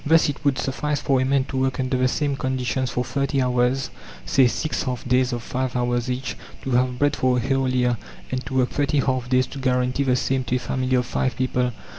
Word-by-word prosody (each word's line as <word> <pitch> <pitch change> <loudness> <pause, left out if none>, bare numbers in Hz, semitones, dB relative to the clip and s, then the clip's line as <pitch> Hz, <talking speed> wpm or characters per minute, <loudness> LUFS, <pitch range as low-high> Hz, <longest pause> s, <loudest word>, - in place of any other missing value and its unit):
Thus 160 +1 +4
it 145 - -5
would 140 -2 +2
suffice 145 +2 -1
for 135 -2 +2
a - - +1
man 135 0 +2
to 135 - -5
work 130 0 0
under 130 0 0
the 130 0 +3
same 140 +1 0
conditions 130 -1 -1
for 125 - -1
30 140 +2 -1
hours, 125 +1 +1 0.3
say 130 - +4
6 155 +5 -2
half 125 -2 -3
days 125 +1 +2
of 120 -1 -3
five 130 +1 -3
hours 120 0 0
each, 125 +1 -3 0.3
to 135 - -3
have 125 0 +2
bread 145 +2 +2
for 130 -2 +2
a - - +2
whole 135 +1 +1
year; 125 -2 +1 0.3
and 130 0 -2
to 130 - -5
work 125 -1 +2
30 145 0 +1
half 130 -2 -1
days 130 0 +3
to 140 - -9
guarantee 125 0 +1
the 130 -2 +2
same 130 +1 0
to 125 - 0
a - - +3
family 130 0 -1
of 125 0 +2
5 130 - -1
people. 125 -1 0
130 Hz, 235 wpm, -23 LUFS, 125-135 Hz, 0.3 s, Thus